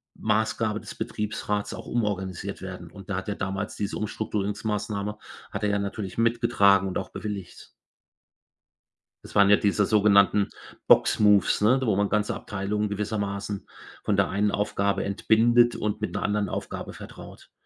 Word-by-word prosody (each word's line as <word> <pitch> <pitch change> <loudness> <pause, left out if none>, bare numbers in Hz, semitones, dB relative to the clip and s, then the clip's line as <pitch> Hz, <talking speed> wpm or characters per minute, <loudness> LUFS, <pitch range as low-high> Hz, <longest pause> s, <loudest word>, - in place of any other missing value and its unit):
Maßgabe 110 0 0
des - - -9
Betriebsrats 105 -1 -3
auch - - -8
umorganisiert 100 -4 -3
werden. 90 -3 -8
Und 100 0 -13
da 100 - -1
hat 95 - -5
er 100 - -2
damals 95 +2 -3
diese 100 0 -3
Umstrukturierungsmassnahme 105 0 -3 0.3
hat - - -4
er 105 - +2
ja 105 0 +1
natürlich 100 0 -5
mitgetragen 100 -4 +3
und 95 - -2
auch - - -6
bewilligt. 100 -4 -7 1.6
Das - - -13
waren 100 -1 +6
ja 105 - +8
diese 100 0 +2
sogenannten 100 -1 +4 0.4
Box-Moves, 105 -1 +4
ne, 125 +5 +4
wo 110 -5 +2
man 100 0 +1
ganze 105 0 0
Abteilungen 105 +1 -2
gewissermaßen 100 -1 -3 0.4
von 105 - +1
der 100 -1 +2
einen 100 +2 +1
Aufgabe 100 -1 0
entbindet 120 +4 +3
und 105 0 -2
mit 110 - -2
'ner - - -2
anderen 105 -1 0
Aufgabe - - -5
vertraut - - -12
105 Hz, 150 wpm, -26 LUFS, 100-105 Hz, 1.6 s, ja